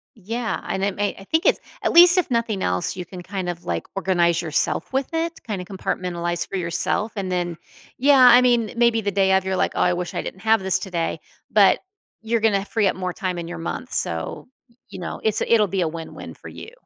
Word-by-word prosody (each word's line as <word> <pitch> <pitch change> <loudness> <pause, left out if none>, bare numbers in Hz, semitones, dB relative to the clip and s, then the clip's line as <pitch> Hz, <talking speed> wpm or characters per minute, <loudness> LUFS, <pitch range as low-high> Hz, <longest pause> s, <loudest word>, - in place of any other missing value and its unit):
Yeah, 225 +3 -3
and 190 - -2
it 200 -1 0
may 205 0 -1
I 195 - -11
think 320 - 0
it's - - +4 0.2
at - - +1
least 355 +2 +8
if 360 - +1
nothing 230 -4 -1
else 90 - -1
you 180 - -5
can, 180 -2 -9
kind 185 0 -5
of, 175 -1 -6
like, 85 -1 -3
organize 175 -3 +2
yourself 160 - -1
with 265 0 0
it, 330 +1 -2
kinda 195 -5 -3
compartmentalize 175 -2 -2
for 195 - -4
yourself, 185 +5 -1
and 190 -2 -3
then 175 -2 -2 0.4
yeah, 265 -1 +6
I 245 +1 +8
mean, 240 -3 +2
eh, - - -10
maybe 235 -1 +3
the 200 -1 -1
day 190 0 +2
of 190 0 +2
you're 190 0 -1
like, - - +1
"Oh, - - 0
I 180 - +3
wish 175 0 -4
I - - -2
didn't 190 - -8
have 220 -2 +3
this 190 -1 +1
today." 170 -4 -3 0.3
But, - - +5 0.4
you're 230 +1 0
gonna 200 -3 +2
free 220 -2 0
up - - 0
more 185 -1 -3
time 185 -3 -3
in 170 - -6
your 175 0 -6
month, 165 - -5
so, 80 0 -2 0.4
you 190 - -9
know, 175 - -5
it's 220 -1 +1
it'll 220 -3 +3
be 190 0 -1
a 165 - +1
win-win 165 0 -8
for - - -11
you. 455 - -10
190 Hz, 230 wpm, -22 LUFS, 175-225 Hz, 0.4 s, least